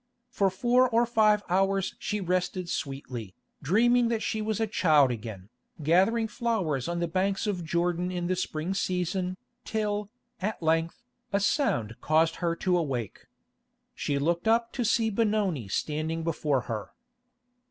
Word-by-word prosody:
For 200 -5 +2
four 245 +6 +3
or 235 0 +3
five 215 -3 +3
hours 195 +1 +1
she 210 - -2
rested 185 0 -1
sweetly, 125 - -5 0.3
dreaming 235 - +3
that 230 -1 -1
she 220 - -1
was 215 -1 -1
a 225 - +2
child 155 - +4
again, 105 -4 -7 0.3
gathering 195 +9 +3
flowers 200 - -1
on 170 0 -2
the 170 - 0
banks 190 +4 0
of 195 -5 -2
Jordan 175 +2 0
in 175 -1 -3
the 185 +1 0
spring 170 0 -2
season, 185 -1 -1 0.3
till, 210 -2 -2 0.3
at 210 +3 -2
length, 165 +5 0 0.3
a 200 - +2
sound 125 - 0
caused 160 +1 +2
her 170 -1 0
to 180 +1 +1
awake. 125 - -4 0.7
She 140 - -2
looked 170 +7 0
up 230 +1 +2
to 245 - -1
see 225 0 +2
Benoni 205 - 0
standing 155 +9 -2
before 150 -4 0
her. 105 -5 -5
180 Hz, 150 wpm, -28 LUFS, 155-215 Hz, 0.7 s, child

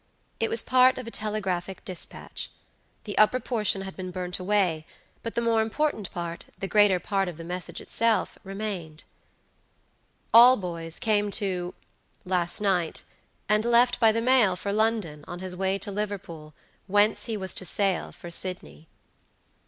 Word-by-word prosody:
It 225 - 0
was 230 - 0
part 255 0 +5
of 255 - -6
a 230 - -7
telegraphic 195 -4 -3
dispatch. 185 -2 -6 0.5
The 205 - -6
upper 215 +4 +5
portion 215 -6 0
had 190 0 -7
been 185 -1 -6
burnt 180 0 -4
away, 185 -5 +1 0.3
but 230 - -5
the 235 - 0
more 230 -1 +3
important 220 - -1
part, 170 -1 -5
the 195 - -4
greater 205 -3 +4
part 195 0 -1
of 175 -3 -6
the 165 - -8
message 180 +2 -5
itself, 230 -4 0
remained. 195 -6 -5 1.3
"alboys 180 -9 +5
came 210 -2 +1
to 180 -3 -3 0.5
last 180 -2 0
night, 180 -5 0 0.4
and 210 +2 +3
left 240 +1 +4
by 225 -2 +6
the 230 +1 0
mail 235 -6 +4
for 200 +2 -3
London, 210 -9 0
on 175 - -6
his 185 0 -5
way 190 +1 0
to 200 +1 -5
Liverpool, 180 -7 -5 0.3
whence 205 +1 +3
he 225 -2 -3
was 190 -2 -1
to - - -4
sail 190 +1 +1
for 175 - -10
Sydney." 180 -3 -4
195 Hz, 155 wpm, -26 LUFS, 180-220 Hz, 1.3 s, by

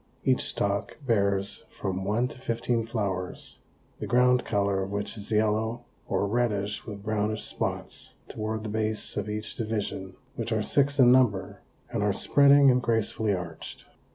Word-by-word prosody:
Each - - +3
stalk 100 0 -2
bears 100 -4 +1
from 95 0 -4
one 110 +5 +1
to - - -11
fifteen 115 -1 -1
flowers, 100 -5 -3 0.4
the - - -4
ground 125 0 +4
color 100 -1 +1
of 95 - -3
which 100 +2 -3
is 105 0 -9
yellow 110 +2 +1 0.2
or - - 0
reddish 105 -3 -1
with 100 -2 -7
brownish 110 0 -1
spots - - -4
toward 110 0 -4
the 110 - -4
base 110 0 -1
of 105 0 -3
each 105 +1 -4
division, 105 -4 -3 0.2
which - - -4
are - - +1
six 140 0 +2
in 125 -3 +7
number 125 -7 +2 0.3
and 115 -3 -1
are 105 -1 +2
spreading 140 +3 +6
and 125 0 +2
gracefully 110 -2 +1
arched. 85 -3 -7
110 Hz, 155 wpm, -27 LUFS, 100-115 Hz, 0.4 s, in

